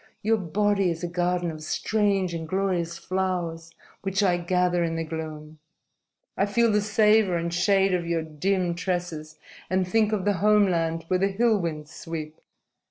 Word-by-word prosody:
Your 220 +2 +3
body 200 +1 +1
is 165 0 -4
a - - 0
garden 175 0 -1
of 155 -1 -9
strange 195 +2 0
and 165 -1 -4
glorious 180 -2 -1
flowers 175 -3 -3 0.3
which 195 +1 0
I 180 -3 +3
gather 180 0 +1
in 165 -1 -1
the 165 - -2
gloom. 155 -1 -7 0.8
I 195 - +1
feel 230 +2 +2
the 210 0 +2
savor 210 -3 +3
and 170 0 -3
shade 195 +2 +3
of 175 -2 -1
your 170 -1 0
dim 175 +3 -1
tresses, 170 -4 -4 0.3
and 185 0 +1
think 215 +2 +2
of 205 -3 -1
the 205 - +3
home 210 0 +5
land 165 -3 -1
where 185 +1 +1
the 195 - +3
hill 215 +2 +2
winds 155 -3 -5
sweep. 160 -2 -7
180 Hz, 170 wpm, -25 LUFS, 165-195 Hz, 0.8 s, home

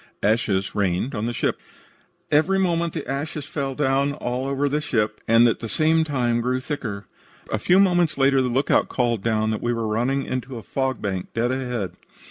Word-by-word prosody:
ASHES 100 -3 +1
RAINED 100 +6 0
ON 105 0 -2
THE - - -1
SHIP 120 - -1 0.7
"Every 160 +6 +3
moment 170 -3 +1
the - - -5
ashes 145 +2 -4
rained 135 -3 -2
down 140 0 +1
all 130 -1 -3
over 140 +1 0
the 150 +2 0
ship, 115 -8 -1
and 115 +1 +6
at 115 - 0
the 115 - -5
same 160 +4 +3
time 120 -6 0
grew 125 +2 0
thicker. 120 -8 -5 0.5
A 110 - 0
few 180 - +4
moments 175 -5 +3
later, 135 0 +4
the 125 - 0
lookout 135 +4 +2
called 120 -4 0
down 110 0 +1
that 110 - -3
we 120 0 0
were 115 -1 -2
running 125 +6 0
into 130 -1 -4
a 115 - -8
fog 130 -2 -2
bank 95 -3 -2
dead 120 +2 +1
ahead. 125 -8 -3
130 Hz, 195 wpm, -23 LUFS, 115-145 Hz, 0.7 s, and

